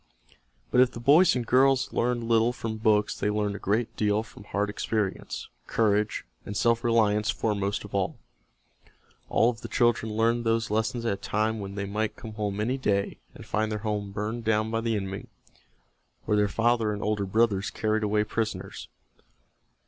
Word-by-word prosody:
But 125 - +5
if 130 0 +3
the - - -7
boys 145 +9 +5
and 125 -2 -1
girls 130 +2 +3
learned 120 0 0
little 115 0 +3
from 115 -2 -4
books 110 -1 +2
they 105 - -1
learned 105 -1 -1
a - - -6
great 110 +4 -1
deal 105 0 +1
from 105 -2 -14
hard 105 0 -1
experience; 105 -1 -3 0.2
courage 105 -1 +1 0.2
and 105 - -5
self 115 0 +2
reliance 105 -3 +2
foremost 100 0 -1
of 105 - -12
all. 95 -2 -1 1.1
All 115 +2 +4
of 115 -1 -12
the - - -6
children 120 -3 +1
learned 115 +2 +1
those 115 -1 0
lessons 110 +2 -1
at 115 - +1
a - - -4
time 110 +3 -1
when 100 -1 -6
they 100 -1 -3
might 105 +2 -2
come 110 -2 -9
home 105 -1 -3
any 125 +6 0
day 100 -5 0 0.2
and - - -11
find 110 0 -1
their 105 - -1
home 105 -2 -2
burned 110 +4 -3
down 110 0 +1
by 115 0 0
the 115 -1 0
enemy 95 -1 -4 1.0
or 105 - +2
their 105 0 +3
father 115 0 +1
and 105 0 -4
older 105 -2 0
brothers 105 -1 +2
carried 110 0 0
away 105 0 +2
prisoners. 110 +1 -4
110 Hz, 180 wpm, -27 LUFS, 105-115 Hz, 1.1 s, But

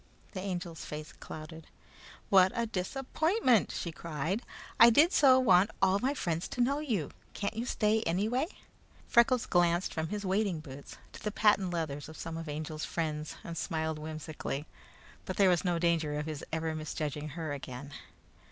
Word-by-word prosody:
The 185 - -5
Angel's 175 -4 -4
face 150 +1 -7
clouded. 160 0 -9 0.6
"What 190 -1 +6
a 235 -1 +1
disappointment!" 255 - +1
she 170 - -4
cried. 165 - -3 0.4
"I 235 - +10
did 300 +10 +5
so 265 -3 +7
want 195 -5 +5
all 190 +1 +3
my 270 +5 0
friends 170 - -2
to - - -7
know 275 +4 +2
you. 225 - -2 0.2
Can't 200 +1 -2
you 235 +3 -3
stay 215 -1 +2
anyway?" 220 - 0 0.6
Freckles 235 0 +4
glanced 175 0 +2
from 160 0 -2
his 205 +3 -4
wading 190 -3 0
boots 140 -2 -10 0.2
to - - -10
the 210 - -1
patent 205 -3 +3
leathers 155 -4 -3
of 155 - -10
some 165 - -5
of 165 0 -6
the - - -3
Angel's 155 +1 -5
friends, 155 -2 -3
and 170 - -6
smiled 160 -1 -2
whimsically, 155 -2 -5 0.6
but 185 - -4
there 195 -2 +6
was 175 - +2
no 175 -2 +1
danger 165 -3 +1
of 150 - -2
his 155 -2 -5
ever 160 0 -1
misjudging 155 -1 -4
her 160 -3 -3
again. 140 0 -7
170 Hz, 170 wpm, -31 LUFS, 155-210 Hz, 0.6 s, I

